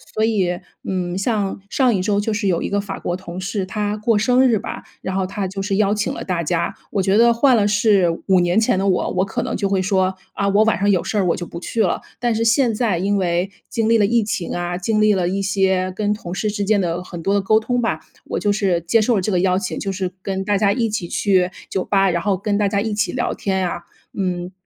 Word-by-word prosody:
所 220 - +1
以， 190 -6 0 0.3
嗯， 180 -1 -2
像 200 -2 -1
上 255 -4 +3
一 185 - 0
周 205 0 +1
就 220 - -2
是 210 -1 -1
有 170 -3 +1
一 - - -2
个 205 - 0
法 200 - -6
国 175 - -2
同 180 -1 -8
事， 195 0 -2
他 210 +2 -2
过 225 +2 +1
生 250 +5 +4
日 225 -4 +2
吧， - - -6 0.2
然 190 - -4
后 190 -1 0
他 195 0 -3
就 195 +1 -7
是 195 0 -1
邀 205 -1 +3
请 210 0 -1
了 - - -6
大 175 -3 -2
家。 170 +1 -1 0.2
我 200 - 0
觉 195 +2 +2
得 235 +1 +6
换 250 0 +4
了 205 - +3
是 205 -3 +3 0.2
5 190 -2 +5
年 175 +4 +2
前 220 - +2
的 195 - 0
我， 185 - +1
我 185 +1 +1
可 195 - -3
能 - - -3
就 200 - 0
会 195 -1 +1
说： 190 -1 +1 0.2
“啊， 200 - -1
我 205 +2 +4
晚 225 - +2
上 205 +1 +2
有 185 -4 +2
事 215 - -2
儿 195 - +2
我 170 - +2
就 175 - -6
不 170 - -7
去 225 +5 -2
了。” 180 - +1 0.2
但 240 -1 +1
是 225 +1 0
现 235 0 +3
在 210 -7 0
因 200 +2 +1
为 180 0 0 0.2
经 225 -1 0
历 230 - +5
了 205 - +4
疫 230 +1 +2
情 200 -4 -3
啊， 175 0 -2
经 215 +4 0
历 215 0 +5
了 185 -3 0
一 195 +2 -1
些 190 -1 +1
跟 210 -1 0
同 185 -4 -7
事 210 +3 -1
之 205 -1 -2
间 205 +1 +2
的 175 0 -2
很 175 -2 -8
多 200 - +1
的 200 - +2
沟 215 +3 +3
通 245 +2 -1
吧， 160 -9 -1 0.3
我 - - -3
就 205 - +1
是 195 -4 +1
接 215 +7 +2
受 235 +2 +2
了 195 - +1
这 210 - -1
个 180 - +2
邀 185 0 +2
请， 220 - -4
就 195 - -2
是 185 -1 -3
跟 190 0 -3
大 205 -1 +2
家 200 -2 +3
一 230 +1 0
起 205 -5 -3
去 185 -2 +2 0.2
酒 190 - -1
吧， 195 -1 +2
然 170 0 -1
后 195 -2 0
跟 205 +1 -1
大 205 - +2
家 200 0 0
一 220 -1 -2
起 210 +1 0
聊 - - -1
天 190 -2 -1
啊。 175 0 -4 0.3
嗯， 180 -2 -2
200 Hz, 290 characters per minute, -20 LUFS, 185-215 Hz, 0.3 s, 得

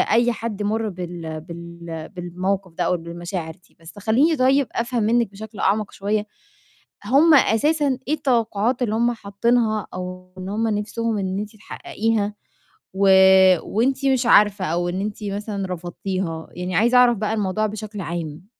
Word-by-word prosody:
أي 235 +2 +4
حد 220 -2 -4
مَر 220 +2 -1
بال 175 -4 -6
بال 170 -1 -8
بالموقِف 185 +1 -3
ده - - -2
أو 180 - +1
بالمشاعر 170 0 -6
دي. - - -32
بس 165 +5 -12
خلّيني 250 - +2
طيب 265 +1 +3
أفهم 235 0 -1
منِّك 230 0 +2
بشكل 215 +1 -10
أعمق 205 +1 +1
شوية 210 +1 -1 0.8
هُم 285 +9 +5
أساسا 285 +2 +3
إيه 305 - +2
التوقعات 240 -4 0
اللي 220 -3 0
هُم 235 +2 +2
حاطّينها 220 0 0
أو 185 0 -7
إن 185 0 -6
هُم 220 +3 -1
نَفْسهم 220 +1 -2
إن 190 -1 -2
أنتِ 210 +1 -6
تحققيها 215 0 -2 0.6
و 195 +1 +2 0.5
وأنتِ 265 +6 0
مش 260 -2 +2
عارفة 205 -4 +5
أو 175 +2 -1
إن 185 +2 -3
أنتِ 210 0 -5
مثلًا 200 0 -3
رفضتيها، 175 -1 -4
يعني 180 0 -3
عايزة 240 +5 +4
أعرف 245 -1 +5
بقى 215 +1 -1
الموضوع 215 0 0
بشكل 210 0 -6
عام؟ 165 0 -5
210 Hz, 155 wpm, -22 LUFS, 185-230 Hz, 0.8 s, هُم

